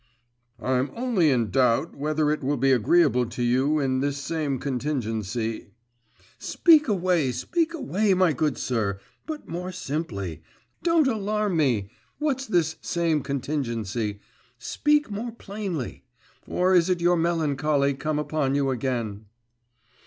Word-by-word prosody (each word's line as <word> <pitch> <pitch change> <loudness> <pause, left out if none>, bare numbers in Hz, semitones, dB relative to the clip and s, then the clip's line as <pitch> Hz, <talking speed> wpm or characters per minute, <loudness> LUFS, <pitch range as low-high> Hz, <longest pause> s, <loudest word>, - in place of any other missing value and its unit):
'I'm 130 +3 0
only 230 -10 +2
in 120 -7 +1
doubt, 125 - +2
whether 150 +1 0
it 150 - -2
will 140 +2 0
be 135 +2 +3
agreeable 125 0 +3
to 120 - -4
you 130 +5 +2
in 130 -3 +1
this 140 +1 -1
same 145 -1 -2
contingency 115 -5 -3 0.4
' - - -31
'Speak 315 -4 +4
away, 180 - +1
speak 335 - -1
away, 215 - +1
my 180 -3 +3
good 145 -2 0
sir, 105 -6 -1 0.3
but 310 -2 -6
more 180 +2 -4
simply. 125 - -4 0.4
Don't 335 -3 +3
alarm 210 -4 0
me! 120 -11 +1 0.3
What's 270 -3 -1
this 165 -6 +1
same 165 -3 0
contingency? 120 -7 -3 0.4
Speak 295 -5 +1
more 225 +3 -4
plainly. 195 - -5 0.4
Or 185 +1 +2
is 175 0 +4
it 180 -1 +1
your 175 +1 +3
melancholy 150 -4 +1
come 150 +3 -2
upon 150 -2 0
you 140 -1 +1
again? 115 -5 -3
150 Hz, 135 wpm, -25 LUFS, 125-185 Hz, 0.4 s, Speak